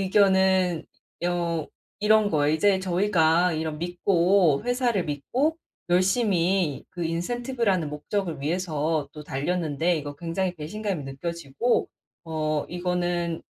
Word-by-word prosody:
의견은 190 -3 +3 0.4
여 170 -3 -1 0.3
이런 215 0 +4
거예요. 150 -1 +2
이제 195 +3 +3
저희가 180 -2 +2
이런 160 -1 -3
믿고 175 -1 +2
회사를 245 -6 +1
믿고 255 - -1 0.3
열심히 185 - +2
그 175 - -6
인센티브라는 200 - -1
목적을 165 +3 -3
위해서 155 -2 -1
또 150 - -9
달렸는데 160 +3 0
이거 145 -1 -5
굉장히 175 +3 -2
배신감이 185 +2 -4
느껴지고 165 - -1 0.4
"어 155 -2 -1
이거는 175 -1 -1
175 Hz, 270 characters per minute, -25 LUFS, 155-195 Hz, 0.4 s, 이런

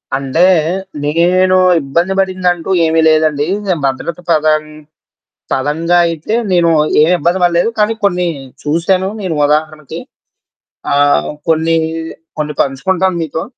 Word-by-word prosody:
అంటే 135 +5 0 0.6
నేను 180 +4 +2 0.3
ఇబ్బంది 170 +7 -1
పడిందంటూ 185 -2 -1 0.2
ఏమీ 160 0 +1
లేదండి. 155 -2 +1 0.4
భద్రత 135 +6 -3
పదం 155 -1 +2 0.9
పరంగా 160 +6 0
అయితే 165 +6 -4 0.2
నేను 175 -2 +3 0.3
ఏమి 160 +4 +4
ఇబ్బంది 170 +4 0
పడలేదు. 175 +4 +2
కానీ 210 +2 +2
కొన్ని 180 -2 +1 0.4
చూశాను 170 +5 0
నేను 185 -5 -3
ఉదాహరణకి. 155 0 -2 1.0
ఆహ్, 145 0 +2 0.2
కొన్ని, 160 +1 +2 0.6
కొన్ని 150 0 -3
పంచుకుంటాను 180 +7 -1
మీతో. 160 0 -4
165 Hz, 105 wpm, -14 LUFS, 150-180 Hz, 1.0 s, ఏమి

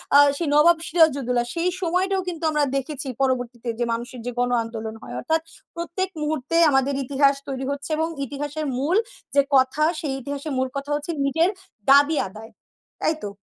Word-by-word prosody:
আ - - +10 0.2
সেই 335 - -2
নবাব 330 +3 +6
সিরাজউদ্দৌলা 275 -7 +3
সেই 345 +2 +1
সময়টাও 375 +3 +1
কিন্তু 335 -2 -5
আমরা 300 -1 +2
দেখেছি 275 0 -3
পরবর্তীতে 245 -2 -1
যে - - +2
মানুষের 240 +2 -5
যে 245 - -2
গণ 245 0 +2
আন্দোলন 225 -1 -6
হয় 120 - -8
অর্থাৎ 320 - 0 0.3
প্রত্যেক 345 +3 -3
মুহূর্তে 305 +1 -2 0.2
আমাদের 270 +1 +2
ইতিহাস 275 +1 +3
তৈরি 265 -1 -4
হচ্ছে 280 +2 -5
এবং 320 +1 +1 0.2
ইতিহাসের 290 +3 -4
মূল 305 +8 +1 0.4
যে 280 - +7
কথা 260 +3 +3 0.2
সেই 285 -4 -2
ইতিহাসের 285 +2 -5
মূল 260 0 +1
কথা 275 +1 -5
হচ্ছে 295 +3 -3
নিজের 325 +6 +3 0.4
দাবি 285 +3 +6
আদায়। 220 +3 -11 0.5
তাই 315 - +2
তো? 205 - -3
280 Hz, 170 wpm, -23 LUFS, 260-320 Hz, 0.5 s, আ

